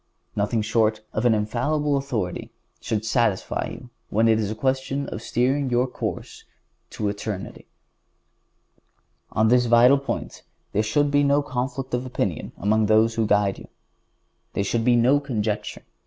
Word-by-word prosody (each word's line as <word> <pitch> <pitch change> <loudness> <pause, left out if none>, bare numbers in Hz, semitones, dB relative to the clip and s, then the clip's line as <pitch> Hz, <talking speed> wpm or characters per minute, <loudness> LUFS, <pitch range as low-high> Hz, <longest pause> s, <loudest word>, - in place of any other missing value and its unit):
Nothing 105 +2 0
short 110 0 +1
of 110 - -1
an 115 - +4
infallible 140 +8 0
authority 120 -10 -3 0.3
should 110 -2 -2
satisfy 110 -4 0
you 125 - -11 0.2
when 110 +2 +2
it 110 -1 +4
is 105 -2 -1
a 110 - -3
question 135 +3 -1
of 110 - -6
steering 130 +4 0
your 125 +1 +2
course 125 - -6 0.5
to 105 - -3
eternity. 100 -1 -5 1.7
On 110 +1 +3
this 125 0 +4
vital 120 +4 +6
point 140 - -5 0.3
there 105 - +1
should 140 +7 +1
be 145 0 +4
no 140 +1 +3
conflict 130 0 -4
of 125 0 0
opinion 125 - -3
among 105 +2 +2
those 110 +1 +3
that 115 -2 +1
guide 100 -1 +2
you. - - -12 0.9
There 100 - 0
should 115 +3 0
be 120 0 +4
no 125 +5 +4
conjecture. 110 -7 -3
115 Hz, 155 wpm, -24 LUFS, 110-130 Hz, 1.7 s, vital